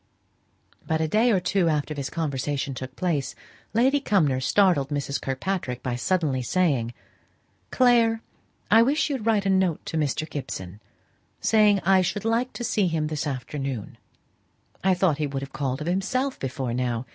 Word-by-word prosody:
But 160 Hz, 0 st, +1 dB
a 160 Hz, -, +1 dB
day 220 Hz, +9 st, +3 dB
or 195 Hz, -, +3 dB
two 180 Hz, -1 st, +1 dB
after 150 Hz, 0 st, -1 dB
this 140 Hz, -2 st, -4 dB
conversation 140 Hz, -3 st, -2 dB
took 130 Hz, 0 st, -7 dB
place, 160 Hz, -7 st, -1 dB, 0.4 s
Lady 260 Hz, +6 st, +3 dB
Cumnor 165 Hz, -, +2 dB
startled 170 Hz, -2 st, +3 dB
Mrs. 140 Hz, -1 st, -2 dB
Kirkpatrick, 135 Hz, -2 st, -3 dB
by 125 Hz, -1 st, -2 dB
saying 150 Hz, -2 st, 0 dB
suddenly, 135 Hz, -8 st, 0 dB, 0.7 s
"Clare, 230 Hz, -3 st, +3 dB, 0.5 s
I 225 Hz, +2 st, +8 dB
wish 290 Hz, +5 st, +2 dB
you'd 245 Hz, -5 st, -3 dB
write 210 Hz, -3 st, +2 dB
a 195 Hz, -, +2 dB
note 190 Hz, -4 st, +1 dB
to 160 Hz, -, -3 dB
Mr. 155 Hz, +1 st, -1 dB
Gibson, 105 Hz, -, -6 dB, 0.6 s
saying 210 Hz, -3 st, +4 dB
I 190 Hz, +1 st, +4 dB
should 200 Hz, +3 st, -2 dB
like 230 Hz, +3 st, +1 dB
to 240 Hz, -, -5 dB
see 210 Hz, -4 st, +1 dB
him 160 Hz, -2 st, -1 dB
this 150 Hz, -1 st, -3 dB
afternoon. 135 Hz, -3 st, -5 dB, 0.8 s
I 190 Hz, -1 st, +4 dB
thought 175 Hz, -5 st, +1 dB
he 150 Hz, -, 0 dB
would 135 Hz, -1 st, -4 dB
have 135 Hz, -, -9 dB
called 135 Hz, 0 st, -2 dB
of -, -, -3 dB
himself 255 Hz, +9 st, -1 dB
before 130 Hz, -2 st, -3 dB
now. 120 Hz, -1 st, -1 dB
160 Hz, 165 wpm, -25 LUFS, 135-200 Hz, 0.8 s, I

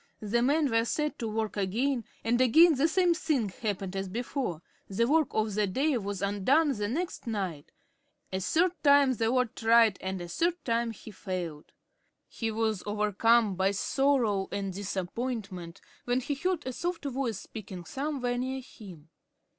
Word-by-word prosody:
The 220 Hz, +3 st, 0 dB
men 285 Hz, +2 st, +2 dB
were 230 Hz, 0 st, +3 dB
set 300 Hz, +5 st, -2 dB
to 230 Hz, -, -2 dB
work 220 Hz, 0 st, -2 dB
again, 230 Hz, +5 st, 0 dB, 0.2 s
and 240 Hz, +2 st, +2 dB
again 320 Hz, +7 st, +7 dB
the 285 Hz, +3 st, +2 dB
same 350 Hz, +1 st, +3 dB
thing 280 Hz, -10 st, 0 dB
happened 195 Hz, -1 st, -4 dB
as 195 Hz, 0 st, -3 dB
before. 230 Hz, -, -3 dB, 0.2 s
The 200 Hz, +4 st, +1 dB
work 310 Hz, +1 st, +3 dB
of 215 Hz, -1 st, -1 dB
the 210 Hz, 0 st, +1 dB
day 270 Hz, +9 st, +1 dB
was 200 Hz, -1 st, -4 dB
undone 260 Hz, +10 st, +2 dB
the 205 Hz, -1 st, -2 dB
next 325 Hz, -, -3 dB
night. 190 Hz, -9 st, -3 dB, 0.6 s
A 190 Hz, -, 0 dB
third 335 Hz, -, +2 dB
time 280 Hz, -2 st, +5 dB
the 225 Hz, -1 st, 0 dB
lord 250 Hz, -2 st, +1 dB
tried, 225 Hz, -3 st, +4 dB
and 190 Hz, 0 st, -3 dB
a 175 Hz, -, -6 dB
third 335 Hz, -, 0 dB
time 235 Hz, -1 st, +1 dB
he 220 Hz, 0 st, -9 dB
failed. 180 Hz, -6 st, -5 dB, 0.6 s
He 225 Hz, -, -3 dB
was 220 Hz, -3 st, -1 dB
overcome 210 Hz, +1 st, +3 dB
by 190 Hz, +1 st, +1 dB
sorrow 220 Hz, -1 st, +1 dB
and 195 Hz, -2 st, -3 dB
disappointment, 195 Hz, -2 st, -4 dB, 0.2 s
when 245 Hz, +1 st, +1 dB
he 275 Hz, +3 st, -2 dB
heard 355 Hz, +4 st, -1 dB
a 260 Hz, -, -3 dB
soft 345 Hz, +2 st, -3 dB
voice 260 Hz, -5 st, -2 dB
speaking 190 Hz, -4 st, -8 dB
somewhere 255 Hz, -, -2 dB
near 260 Hz, +1 st, -2 dB
him. 180 Hz, -, -13 dB
225 Hz, 165 wpm, -29 LUFS, 195-270 Hz, 0.6 s, again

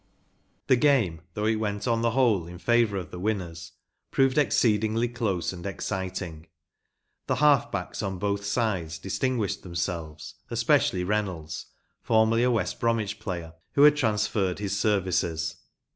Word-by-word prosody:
The 130 Hz, -, +4 dB
game, 120 Hz, -, +2 dB
though 105 Hz, -, -1 dB
it 110 Hz, 0 st, +2 dB
went 105 Hz, -1 st, -2 dB
on 115 Hz, -1 st, +1 dB
the 115 Hz, -, +2 dB
whole 115 Hz, -8 st, +2 dB
in 90 Hz, 0 st, -9 dB
favour 115 Hz, 0 st, +2 dB
of 90 Hz, -4 st, -6 dB
the 90 Hz, -, -7 dB
winners, 90 Hz, -5 st, -3 dB, 0.4 s
proved 135 Hz, +1 st, +3 dB
exceedingly 110 Hz, -2 st, +2 dB
close 110 Hz, -8 st, -2 dB
and 85 Hz, -1 st, -9 dB
exciting. 95 Hz, -4 st, -4 dB, 0.8 s
T 130 Hz, -, +1 dB
he -, -, -5 dB
half 145 Hz, -4 st, +4 dB
backs 90 Hz, -2 st, -4 dB
on 95 Hz, -2 st, -3 dB
both 100 Hz, +2 st, -1 dB
sides 100 Hz, -7 st, -1 dB
distinguished 100 Hz, +4 st, -1 dB
them¬ 85 Hz, -2 st, -7 dB
selves, 80 Hz, -3 st, -4 dB, 0.2 s
especially 90 Hz, -, +2 dB
Reynolds, 90 Hz, -6 st, -3 dB, 0.3 s
formerly 110 Hz, +1 st, +3 dB
a 125 Hz, -, +3 dB
West 115 Hz, -3 st, -1 dB
Bromwich 110 Hz, -3 st, 0 dB
player* 85 Hz, -4 st, -5 dB, 0.2 s
who 140 Hz, -, +5 dB
had 150 Hz, 0 st, +8 dB
transferred 105 Hz, -7 st, 0 dB
his 100 Hz, -1 st, -2 dB
services. 90 Hz, -5 st, 0 dB
100 Hz, 150 wpm, -27 LUFS, 90-115 Hz, 0.8 s, had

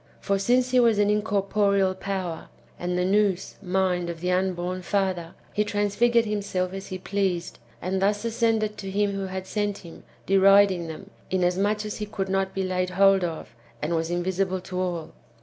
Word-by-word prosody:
For 200 Hz, -1 st, 0 dB
since 250 Hz, +5 st, +2 dB
he 255 Hz, -, +5 dB
w^as 230 Hz, -3 st, +4 dB
an 205 Hz, 0 st, +3 dB
incorporeal 200 Hz, -2 st, +1 dB
power, 185 Hz, -3 st, -4 dB, 0.3 s
and 180 Hz, 0 st, -2 dB
the 180 Hz, -, +1 dB
Nous 195 Hz, -1 st, +1 dB
(mind) 180 Hz, -2 st, 0 dB
of 170 Hz, -1 st, -5 dB
the 180 Hz, +2 st, -1 dB
unborn 185 Hz, 0 st, -1 dB
father, 185 Hz, -3 st, -1 dB, 0.2 s
he 210 Hz, -, +2 dB
transfigured 210 Hz, +3 st, +2 dB
himself 195 Hz, -3 st, -2 dB
as 195 Hz, 0 st, -6 dB
he 185 Hz, -, -5 dB
pleased, 185 Hz, -2 st, -2 dB, 0.2 s
and 190 Hz, +2 st, -1 dB
thus 205 Hz, +3 st, +1 dB
ascended 225 Hz, -2 st, 0 dB
to 195 Hz, -, -5 dB
him 205 Hz, +1 st, +1 dB
who 195 Hz, -1 st, -3 dB
had 190 Hz, 0 st, -5 dB
sent 205 Hz, 0 st, -2 dB
him, 165 Hz, -, -12 dB, 0.2 s
deriding 195 Hz, -2 st, +5 dB
them, 195 Hz, +5 st, -9 dB, 0.2 s
inasmuch 190 Hz, +4 st, +1 dB
as 210 Hz, -, -4 dB
he 210 Hz, -, -4 dB
could 195 Hz, -2 st, -3 dB
not 195 Hz, 0 st, 0 dB
be 195 Hz, -, 0 dB
laid 185 Hz, -1 st, -1 dB
hold 195 Hz, +1 st, +4 dB
of, 160 Hz, -9 st, -4 dB, 0.3 s
and 155 Hz, +6 st, -2 dB
was 165 Hz, 0 st, -1 dB
invisible 185 Hz, +2 st, -1 dB
to 185 Hz, 0 st, -5 dB
all. 175 Hz, -3 st, -3 dB
195 Hz, 180 wpm, -25 LUFS, 180-205 Hz, 0.3 s, he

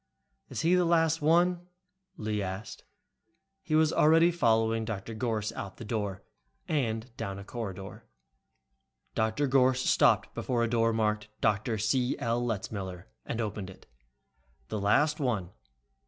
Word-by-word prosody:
"Is -, -, -3 dB
he 165 Hz, +3 st, +3 dB
the 180 Hz, 0 st, +4 dB
last 165 Hz, -2 st, +2 dB
one?" 175 Hz, +3 st, +3 dB, 0.5 s
Lee 105 Hz, -5 st, -2 dB
asked. 95 Hz, +3 st, -6 dB, 0.8 s
He 170 Hz, -5 st, -1 dB
was 155 Hz, 0 st, +4 dB
already 165 Hz, +3 st, +5 dB
following 115 Hz, -7 st, +2 dB
Dr. 110 Hz, 0 st, -5 dB
Gorss 110 Hz, -2 st, -2 dB
out 100 Hz, -, -7 dB
the 115 Hz, -, -8 dB
door 105 Hz, -3 st, -3 dB, 0.4 s
and 115 Hz, -4 st, -2 dB
down 95 Hz, 0 st, -4 dB
a 100 Hz, -, -8 dB
corridor. 100 Hz, -4 st, -7 dB, 1.1 s
Dr. 110 Hz, +6 st, 0 dB
Gorss 130 Hz, -1 st, +3 dB
stopped -, -, +3 dB
before 120 Hz, -2 st, -1 dB
a -, -, +2 dB
door 115 Hz, 0 st, +2 dB
marked 105 Hz, -1 st, 0 dB
"Dr. 110 Hz, +2 st, +1 dB
C. 125 Hz, +4 st, +1 dB
L. 120 Hz, -2 st, -1 dB
Letzmiller," 95 Hz, -5 st, -4 dB, 0.2 s
and 115 Hz, -, -3 dB
opened 105 Hz, -3 st, -3 dB
it. 95 Hz, -, -14 dB, 0.8 s
"The 105 Hz, -, -2 dB
last 150 Hz, +10 st, +3 dB
one. 110 Hz, -, -1 dB
115 Hz, 140 wpm, -29 LUFS, 105-145 Hz, 1.1 s, already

